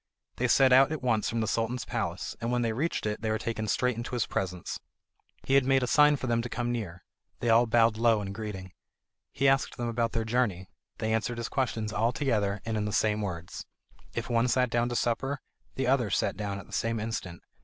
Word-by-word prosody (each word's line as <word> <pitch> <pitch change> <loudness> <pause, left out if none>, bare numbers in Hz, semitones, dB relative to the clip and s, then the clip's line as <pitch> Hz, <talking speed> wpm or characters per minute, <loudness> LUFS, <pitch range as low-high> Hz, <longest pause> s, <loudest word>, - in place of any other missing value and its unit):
They 125 - +1
set 130 +1 +5
out 135 +3 +6
at 155 -4 -4
once 115 -4 +1
for 115 - -3
the 110 - +1
Sultan's 115 +3 -1
palace, - - -3
and 115 +1 -1
when 125 -1 +1
they 115 -1 0
reached 150 +4 -1
it, 105 0 -2
they 110 - -1
were 110 - +1
taken 110 -1 -3
straight 125 +4 +1
into 120 +1 -4
his 120 - +1
presence. 90 -2 -3 0.6
He 135 +1 +4
made 135 0 +2
a - - +2
sign 150 +3 +5
for 135 - -5
them 115 -2 +1
to 120 - -5
come 120 0 -2
near; 95 -7 -5 0.4
they 120 - +1
all 115 +2 +5
bowed 115 -1 +3
low 115 -1 +4
in 100 -1 -5
greeting. 100 -3 -6 0.6
He 135 - +1
asked 135 0 +2
them 120 - -2
about 115 -1 -1
their 115 -1 -1
journey; 110 -6 0 0.3
they 110 0 -1
answered 115 +2 -1
his 115 -1 -3
questions 110 -5 -1
all 115 +2 +2
together, 105 -7 0
and 110 -1 -1
in 105 - -1
the 105 - -2
same 105 +1 +1
words. 90 -3 -5 0.5
If - - -3
one 120 0 +2
sat 125 0 +2
down 120 0 +1
to 120 - -3
supper, 135 +4 0 0.4
the 135 - -1
others 125 -4 +2
sat - - 0
down 100 -2 -3
at 95 - -9
the - - -15
same 115 0 0
instant. 105 -6 -5
115 Hz, 230 wpm, -29 LUFS, 110-125 Hz, 0.6 s, out